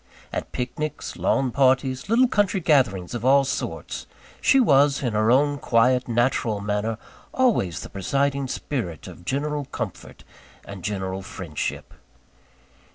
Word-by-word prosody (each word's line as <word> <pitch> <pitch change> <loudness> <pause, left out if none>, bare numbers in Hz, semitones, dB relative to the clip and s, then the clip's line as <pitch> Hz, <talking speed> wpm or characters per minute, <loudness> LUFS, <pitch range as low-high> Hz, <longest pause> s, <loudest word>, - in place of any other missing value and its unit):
At - - -4
picnics, 150 +4 -4
lawn 130 -2 +1
parties, 130 +2 +2
little 245 +3 +5
country 205 -4 +1
gatherings 130 - +2
of 120 -2 -4
all 135 +2 +5
sorts, 135 - -4 0.3
she 270 - +5
was, 140 - +4
in 120 -4 -1
her 110 +1 +2
own 145 +3 +3
quiet, 125 +1 +2
natural 120 -2 +1
manner, 105 +2 -2 0.4
always 220 - +1
the - - -8
presiding 140 +7 -1
spirit 115 - -4
of 85 - -12
general 145 +4 -2
comfort - - -7 0.4
and 100 -3 -9
general 95 -2 -3
friendship. 90 -5 -5
130 Hz, 130 wpm, -24 LUFS, 105-145 Hz, 0.4 s, little